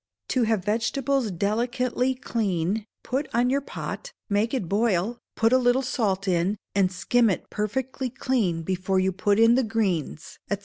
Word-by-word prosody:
To 250 -3 +2
have 215 -4 0
vegetables 240 +3 0
delicately 245 +7 0
clean, 210 - -1 0.2
put 270 +3 -2
on 245 +2 +3
your 280 +1 +1
pot, - - -6 0.2
make 210 +3 +1
it 250 -10 -2
boil, 210 +2 +1 0.2
put 225 +2 +3
a 260 - +6
little 250 +1 +3
salt 200 -6 -1
in, 185 +3 +1 0.2
and 195 -2 +2
skim 230 +5 +2
it 190 - -3
perfectly 255 +5 -2
clean 230 -10 0
before 190 +2 0
you 190 0 +2
put 200 +3 +1
in 230 +1 +6
the 260 - +4
greens, 195 - -2
&c. - - +2
225 Hz, 165 wpm, -25 LUFS, 190-250 Hz, 0.2 s, a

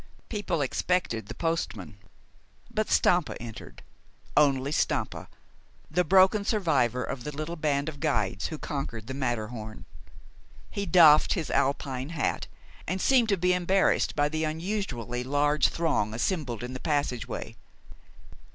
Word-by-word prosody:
People 190 -7 -2
expected 135 -5 -1
the - - -7
postman; 110 - -3 0.7
but 215 -2 -1
Stampa 175 -3 +2
entered, 115 -2 -10 0.5
only 140 -2 +3
Stampa, - - -1 0.6
the 180 +3 +2
broken 190 +4 +5
survivor 150 - +1
of 125 -3 -5
the 150 - -4
little 155 +3 -5
band 145 -3 0
of 150 -2 -5
guides 110 - 0
who 160 - -6
conquered 135 -8 -5
the 130 - -6
Matterhorn. 115 -4 -4 0.9
He 200 -1 -3
doffed 155 -4 +6
his 165 -7 -3
Alpine 135 0 0
hat, 165 -4 -2 0.4
and 185 +3 -1
seemed 245 +1 +3
to 200 - +3
be 180 +1 +2
embarrassed 180 +2 +2
by 145 0 +2
the 155 +1 -2
unusually 155 - -3
large 145 +3 +2
throng 110 -11 0
assembled 125 - -2
in 125 +1 -5
the 130 - -6
passageway. 145 -6 -2
150 Hz, 135 wpm, -27 LUFS, 125-175 Hz, 0.9 s, doffed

